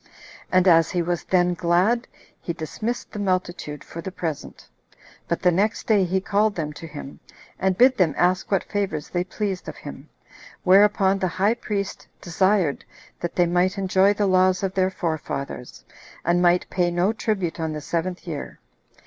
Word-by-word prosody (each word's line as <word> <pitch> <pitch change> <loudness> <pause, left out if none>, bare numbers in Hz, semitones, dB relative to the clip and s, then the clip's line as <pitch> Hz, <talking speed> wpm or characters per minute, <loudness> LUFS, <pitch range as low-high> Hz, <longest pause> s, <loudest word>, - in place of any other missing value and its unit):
And 185 0 +4
as 165 -2 +5
he 175 -3 0
was 175 0 -2
then 180 -1 +2
glad, 180 +8 +1 0.3
he 170 - -3
dismissed 215 +9 -4
the 210 - -6
multitude 180 -6 -2
for 170 - -8
the 190 - -6
present; 165 -5 -6 0.6
but 170 - -2
the 180 - +5
next 205 +5 0
day 205 -4 +3
he 190 +2 0
called 205 +2 +1
them 150 -3 -3
to 165 - -9
him, 145 -2 -9 0.4
and 190 0 +1
bid 255 +1 +5
them 165 -6 +3
ask 180 +1 +1
what 195 -3 +1
favors 195 -8 -3
they 175 0 -1
pleased 190 0 -4
of - - -9
him; 145 0 -10 0.5
whereupon 195 +1 +4
the 185 - +1
high 190 +5 +1
priest 205 -4 -4
desired 185 -3 +1 0.4
that 175 - -4
they 175 - +4
might 180 +3 +1
enjoy 190 0 +3
the 205 0 0
laws 185 0 +3
of 190 -1 -1
their 185 -1 +2
forefathers, 140 - -5 0.4
and 175 +1 +2
might 175 0 +3
pay 175 -2 +1
no 175 +5 +1
tribute 195 -7 -2
on 160 -1 -2
the 155 - -4
seventh 175 +5 -3
year. 155 -5 -6
185 Hz, 175 wpm, -23 LUFS, 170-195 Hz, 0.6 s, as